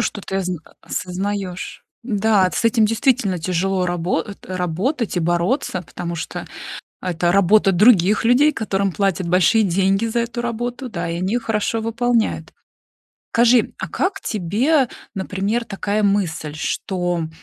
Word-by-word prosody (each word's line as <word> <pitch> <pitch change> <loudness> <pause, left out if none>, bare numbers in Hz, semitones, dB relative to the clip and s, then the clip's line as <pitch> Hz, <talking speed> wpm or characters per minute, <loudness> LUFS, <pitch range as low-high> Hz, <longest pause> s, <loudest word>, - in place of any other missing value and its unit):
что 215 -2 -2
ты 195 0 -4
озн 185 -2 -1 0.2
осознаёшь. 190 0 -4 0.2
Да, 210 -4 +2
с - - -2
этим 225 -1 +4
действительно 225 -5 +1
тяжело 185 +2 0
рабо 175 0 0
э, 205 - -9 0.2
работать 190 - -1
и - - +2
бороться, 175 - 0
потому 170 0 -6
что 165 - -5 0.6
это 175 -1 0
работа 200 +1 +4
других 205 +1 +4
людей, 260 +6 +5
которым 200 -6 -1
платят 190 -2 0
большие 180 +5 +4
деньги 195 +3 +2
за 230 +1 -1
эту 235 +1 -2
работу, 240 +2 -4
да, 175 -5 -4
и 170 - -2
они 185 +2 -1
её 240 - +2
хорошо 225 0 -1
выполняют. 230 0 0 0.8
Скажи, 235 0 +4
а - - -4
как 375 - -1
тебе, 240 - +1 0.3
например, 200 +4 -2
такая 205 0 -2
мысль, 180 -7 0
что 175 0 -2
200 Hz, 140 wpm, -20 LUFS, 180-230 Hz, 0.8 s, людей